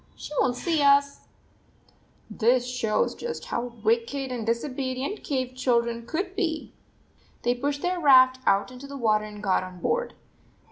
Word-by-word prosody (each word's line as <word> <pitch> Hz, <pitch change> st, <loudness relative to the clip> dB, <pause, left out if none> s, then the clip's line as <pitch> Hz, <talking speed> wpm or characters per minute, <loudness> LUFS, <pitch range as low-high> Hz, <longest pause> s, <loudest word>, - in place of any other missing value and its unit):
She -, -, -9 dB
won 255 Hz, -, +2 dB
t -, -, -8 dB
see 330 Hz, -3 st, 0 dB
us! 280 Hz, 0 st, +3 dB, 0.5 s
" -, -, -34 dB, 0.3 s
This 245 Hz, +2 st, +2 dB
shows 245 Hz, -4 st, 0 dB
just 475 Hz, 0 st, -6 dB
how 240 Hz, 0 st, -3 dB
wicked 235 Hz, +4 st, 0 dB
and 235 Hz, -3 st, -4 dB
disobedient 260 Hz, -, -2 dB
cave 260 Hz, -3 st, -2 dB
children 235 Hz, -2 st, 0 dB
could 375 Hz, +7 st, -3 dB
be! 325 Hz, -6 st, -2 dB, 0.7 s
They 240 Hz, -, +2 dB
pushed 285 Hz, +3 st, -3 dB
their 360 Hz, 0 st, 0 dB
raft 260 Hz, -4 st, +6 dB
out 195 Hz, +5 st, +3 dB
into 255 Hz, +2 st, -10 dB
the 280 Hz, 0 st, -7 dB
wa 220 Hz, -4 st, +2 dB
ter 210 Hz, -, -7 dB
and 210 Hz, 0 st, -10 dB
got 190 Hz, -2 st, +2 dB
on 185 Hz, -1 st, -9 dB
board. 485 Hz, -, -1 dB
255 Hz, 170 wpm, -26 LUFS, 235-285 Hz, 0.7 s, raft